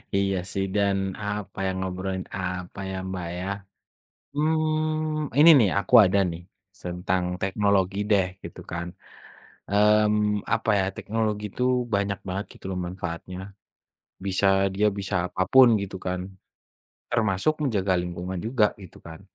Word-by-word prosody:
Iya 100 0 +1 0.2
sih 95 0 -1
dan 100 -1 +2 0.3
apa 105 -1 -4
ya, - - +1
ngobrolin 95 0 -3
apa 90 +1 -5
ya, - - -4
Mbak 90 -2 -4
ya? 90 - -4 0.9
Hmm, 155 -1 0
ini 160 +3 +9
nih 105 - +4
aku 100 +5 -1
ada 95 +1 +2
nih, 85 0 -7 0.4
tentang 90 +1 -1 0.2
teknologi 95 -1 +1
deh 100 -3 +4 0.2
gitu - - -9
kan. 85 0 -3 0.9
Mmm, 105 0 +3
apa 115 0 0
ya, - - +2
teknologi 110 -1 -2
itu 125 - -2 0.3
banyak 100 -1 0
banget 95 +3 -3
gitu - - -17
loh 95 - -3
manfaatnya. 90 0 -6 0.9
Bisa 95 0 0 0.3
dia 105 +2 +3
bisa 95 - -3
apa 90 +1 -4
pun 130 -1 +9
gitu 100 -1 -6
kan, 90 0 -1 0.9
termasuk 110 +4 +1
menjaga 100 -9 +1
lingkungan 90 +1 -5
juga 115 -2 +3 0.2
gitu 90 - -13
kan. 80 -1 -10
100 Hz, 135 wpm, -25 LUFS, 95-105 Hz, 0.9 s, ini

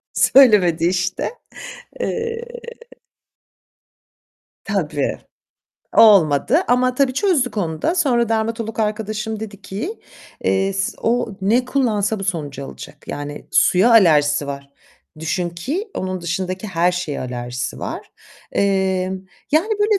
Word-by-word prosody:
Söylemedi 195 -11 +5
işte. 185 0 -1 0.7
Eee 460 0 -2 2.2
Tabii. - - -1 0.8
Olmadı 200 - +6
ama 250 +1 +2
tabii 270 0 +2
çözdük 295 - +1
onu 160 -6 -2
da. 335 - +1
Sonra 250 - +2
dermatolog 225 0 -2
arkadaşım 215 0 -2
dedi 205 -2 -8
ki, 215 - -5 0.4
eee, 195 0 +1
s 195 0 -1
o 235 +1 +1
ne 230 +6 +2
kullansa 220 -6 0
bu - - -4
sonucu 145 -7 -3
alacak 65 - -11
yani 145 0 -6
suya 190 +7 +4
alerjisi 150 -9 +4
var. 140 0 -6 0.5
Düşün 175 +2 -2
ki, 295 - -4
onun 185 -1 -3
dışındaki 185 +3 -3
her 175 -1 +1
şeye 175 -5 -3
alerjisi 125 0 -4
var. - - -6 0.4
Eee, 190 -2 +1 0.4
yani, 330 +9 +3
böyle 415 0 +3
200 Hz, 115 wpm, -20 LUFS, 170-240 Hz, 2.2 s, Olmadı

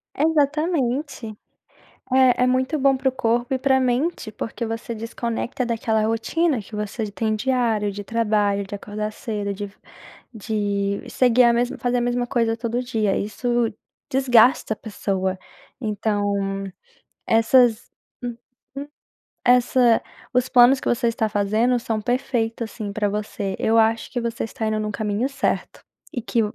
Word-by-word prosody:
Exatamente. 290 -5 0 0.8
É, 255 -1 +5
é - - +3
muito 260 +4 +1
bom 270 -1 +3
pro 265 0 +1
corpo 240 0 0
e - - 0
pra 265 0 +3
mente, 255 +1 0
porque 230 +2 -5
você 225 +1 -4
desconecta 235 +3 -3
daquela 225 -1 0
rotina 240 +5 0
que 205 - -13
você 210 +1 -3
tem 220 +1 -1
diário, 225 -3 +1
de 205 +1 -7
trabalho, 210 -3 +1
de 195 - -8
acordar 210 +1 -4
cedo, 210 -3 -4
de 200 0 -6 0.6
de 205 -2 -2
seguir 250 -1 +4
a 235 - +5
mesma 240 +1 0
fazer 245 0 0
a - - +1
mesma 245 0 0
coisa 230 -2 0
todo 235 +1 -2
dia. 220 -5 0
Isso 240 +2 -1 0.4
desgasta 250 -4 +4
a - - -25
pessoa. 190 -3 -2 0.4
Então 210 -2 -1 1.0
essas 230 +1 +4 0.8
uhum. 280 +1 -6 0.6
Essa 245 -1 +4 0.3
os 250 0 +2
planos 245 +2 +6
que - - -3
você 240 0 +1
está 225 -1 0
fazendo 215 +5 +1
são 225 -2 -2
perfeitos, 230 -1 -1
assim, 210 -3 -5
pra 205 0 0
você. 205 -1 -3
Eu 225 +1 +2
acho 225 0 +2
que 245 - -2
você 235 -1 -3
está 225 0 -4
indo 215 0 0
num 215 0 -2
caminho 210 +4 -1
certo 275 -1 -2 0.3
e 245 - -3
que 230 - 0
230 Hz, 145 wpm, -22 LUFS, 215-250 Hz, 1.0 s, planos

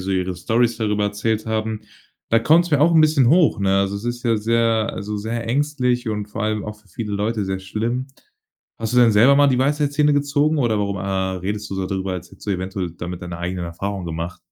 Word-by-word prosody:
so 95 +1 -4
ihre 90 -1 -1
Storys 115 +5 +1
darüber 105 -2 0
erzählt 105 +2 -1
haben, 110 0 -2 0.5
da 115 - +4
kommt's 165 +8 +3
mir 145 - +3
auch 165 +3 +4
'n 160 - +7
bisschen 155 -4 +4
hoch, 170 - +4
ne? 95 0 +2
Also, 100 +1 0
es 105 - -8
ist 120 0 -3
ja 115 -2 +2
sehr 115 0 +1
also 105 +1 -4
sehr 115 +3 -4
ängstlich 125 -4 0
und 105 -1 -3
vor 105 +1 -5
allem 110 -1 -1
auch 105 0 -7
für 105 - -27
viele 105 +4 -5
Leute 105 0 -1
sehr 95 0 -2
schlimm. 115 +7 -3 0.7
Hast 115 +1 -3
du - - +5
denn 115 -3 +6
selber 120 +7 +6
mal 145 0 +5
die 130 -1 +2
Weisheitszähne 145 +1 +2
gezogen 145 +2 +1
oder 115 -5 +1
warum, 100 -2 -2
ah, 95 0 -1
redest 105 +3 -4
du - - -3
so 95 -1 -2
darüber, 95 0 -3
als 90 -1 -6
hättest - - -15
du - - -1
eventuell 95 -1 -3
damit 85 +1 -7
deine 85 -1 -6
eigenen 90 +1 -3
Erfahrungen 95 +3 -4
gemacht? 85 +2 -5
110 Hz, 225 wpm, -21 LUFS, 95-120 Hz, 0.7 s, n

